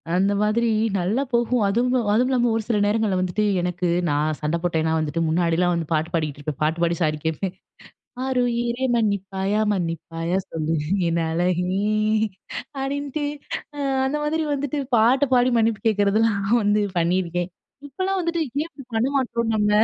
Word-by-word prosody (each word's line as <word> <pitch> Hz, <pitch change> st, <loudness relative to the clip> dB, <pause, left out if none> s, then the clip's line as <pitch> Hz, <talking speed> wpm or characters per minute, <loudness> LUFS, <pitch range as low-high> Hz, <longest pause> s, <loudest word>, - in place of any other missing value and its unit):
அந்த 195 Hz, +2 st, +3 dB
மாதிரி 225 Hz, +2 st, +2 dB, 0.3 s
நல்லா 195 Hz, +8 st, 0 dB
போகும். 240 Hz, 0 st, +2 dB
அதுவும் 240 Hz, +2 st, +1 dB
அதுவும் 245 Hz, +4 st, +3 dB
இல்லாம 245 Hz, -2 st, +2 dB
ஒரு 225 Hz, -, -1 dB
சில 230 Hz, -3 st, +1 dB
நேரங்கள்ல 210 Hz, -2 st, +1 dB
வந்துட்டு 185 Hz, +3 st, 0 dB, 0.2 s
எனக்கு 180 Hz, 0 st, -1 dB, 0.2 s
நான் 150 Hz, +1 st, 0 dB
சண்ட 150 Hz, +2 st, 0 dB
போட்டேன்னா 160 Hz, -2 st, +1 dB
வந்துட்டு 155 Hz, +1 st, -1 dB
முன்னாடிலாம் 170 Hz, +2 st, +2 dB
வந்து 165 Hz, -2 st, -2 dB
பாட்டு 160 Hz, +1 st, 0 dB
பாடிக்கிட்டு 155 Hz, -4 st, -1 dB
இருப்பேன். 145 Hz, -1 st, -5 dB
பாட்டு 160 Hz, +2 st, 0 dB
பாடி 170 Hz, 0 st, +2 dB
சாரி 155 Hz, -2 st, +1 dB
கேட்பேன் 175 Hz, +4 st, -2 dB, 0.7 s
"ஆருயிரே 245 Hz, -1 st, 0 dB
மன்னிப்பாயா! 200 Hz, -2 st, 0 dB
மன்னிப்பாயா! 165 Hz, -1 st, -2 dB
சொல்லு 160 Hz, 0 st, -1 dB, 0.3 s
என் 170 Hz, 0 st, +1 dB
அழகே!" 180 Hz, +3 st, 0 dB, 1.0 s
அப்பிடின்ட்டு, 285 Hz, +2 st, -2 dB, 0.5 s
அ -, -, -9 dB, 0.3 s
அந்த 275 Hz, +3 st, 0 dB
மாதிரி 315 Hz, +2 st, 0 dB
வந்துட்டு 285 Hz, +1 st, -2 dB, 0.2 s
பாட்டு 245 Hz, +6 st, +4 dB
பாடி 250 Hz, 0 st, +4 dB
மன்னிப்பு 225 Hz, -1 st, +1 dB
கேட்கிறதெல்லாம் 205 Hz, 0 st, +2 dB, 0.2 s
வந்து 205 Hz, +1 st, +3 dB, 0.2 s
பண்ணியிருக்கேன். 175 Hz, 0 st, 0 dB, 0.4 s
இப்பலாம், 375 Hz, +7 st, -2 dB
வந்துட்டு 340 Hz, -1 st, -1 dB, 0.2 s
ஏன் 315 Hz, -, -3 dB
இப்பிடி 275 Hz, -5 st, -12 dB
பண்ண 225 Hz, +3 st, +2 dB
மாட்றோம்? 235 Hz, -4 st, 0 dB
நம்ம, 210 Hz, -1 st, +2 dB
205 Hz, 150 wpm, -23 LUFS, 170-240 Hz, 1.0 s, பாட்டு